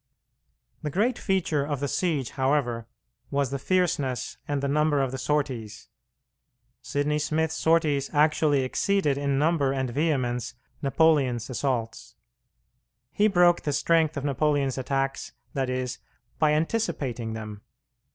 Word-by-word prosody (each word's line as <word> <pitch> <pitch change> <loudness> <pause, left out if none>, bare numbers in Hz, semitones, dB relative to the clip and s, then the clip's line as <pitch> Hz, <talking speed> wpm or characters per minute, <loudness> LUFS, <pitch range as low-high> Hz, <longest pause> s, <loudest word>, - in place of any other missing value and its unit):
The 150 - -3
great 220 - 0
feature 170 -7 0
of 145 -1 -3
the 140 - -1
siege, 150 -7 -1
however, 130 -4 0 0.4
was 140 -2 0
the 140 - -2
fierceness 160 -6 0
and 145 -1 -1
the - - +1
number 150 +1 +2
of 135 -2 0
the 130 - -5
sorties. 130 -6 -2 0.9
Sidney 150 +1 -1
Smith's 160 +1 0
sorties 160 -4 +2
actually 150 -2 +3
exceeded 150 +3 +1
in 140 -1 0
number 150 -2 +2
and 130 -2 -2
vehemence 130 -5 -1 0.3
Napoleon's 135 -4 +2
assaults. 120 -3 -3 1.0
He 210 - +3
broke 175 -3 +4
the 145 - -2
strength 160 +1 +2
of 140 - -3
Napoleon's 140 -2 +1
attacks, 135 +1 -2 0.2
that 135 -2 -1
is, 130 -1 -3 0.4
by 155 -1 +4
anticipating 140 - -1
them. 105 -2 -7
140 Hz, 130 wpm, -26 LUFS, 130-155 Hz, 1.0 s, broke